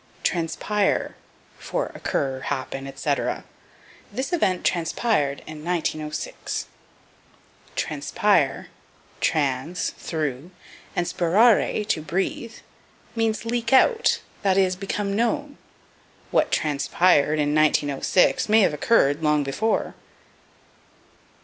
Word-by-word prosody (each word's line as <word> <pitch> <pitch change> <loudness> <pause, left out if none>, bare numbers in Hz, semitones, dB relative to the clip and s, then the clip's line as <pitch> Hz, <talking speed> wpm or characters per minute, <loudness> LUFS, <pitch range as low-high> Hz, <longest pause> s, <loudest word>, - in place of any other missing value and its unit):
Transpire 195 +4 0 0.4
for - - -3
Occur, 135 -1 -2
Happen, 135 0 -4
etc. 140 +1 -2 0.7
"This 270 +7 -3
event 190 - +1
transpired 165 -4 0
in 155 -1 -9
1906." 155 -3 -3 1.1
Transpire - - 0 0.5
(trans, 150 +3 0
through, 155 -1 -4 0.5
and 175 - 0
spirare, 210 +4 +3
to 165 - 0
breathe) 195 +7 -3 0.6
means 225 -1 0
leak 230 0 -2
out, 455 - +4 0.2
that 195 -1 +2
is, 185 -1 +3
become 200 +1 -3
known. 285 +6 -1 0.7
What - - +2
transpired 150 +1 +2
in 145 -1 +1
1906 155 - +2
may 220 +1 +6
have 185 - +3
occurred 150 -2 +2
long 150 -1 +2
before. 140 +12 -1
170 Hz, 90 wpm, -24 LUFS, 150-215 Hz, 1.1 s, may